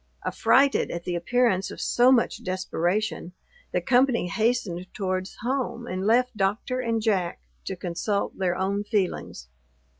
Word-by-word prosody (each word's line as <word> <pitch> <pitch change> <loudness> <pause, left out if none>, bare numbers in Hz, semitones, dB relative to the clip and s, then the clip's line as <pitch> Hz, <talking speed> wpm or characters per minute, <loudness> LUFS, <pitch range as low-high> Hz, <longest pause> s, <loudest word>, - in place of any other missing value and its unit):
Affrighted 275 +1 +3
at 170 0 -5
the 180 - -3
appearance 190 +2 +1
of - - -9
so 245 +2 +4
much 245 -3 +2
desperation, 185 +1 -2 0.4
the - - 0
company 250 -6 +2
hastened 215 -4 0
towards 185 -1 -2
home, 250 -1 -2
and 185 -1 -3
left 250 +2 +3
Doctor 210 +5 -1
and 230 -2 0
Jack 190 -6 0 0.3
to 190 - -3
consult 180 +3 -2
their 180 -2 0
own 200 +2 -1
feelings. 190 - -2
200 Hz, 140 wpm, -26 LUFS, 185-240 Hz, 0.4 s, so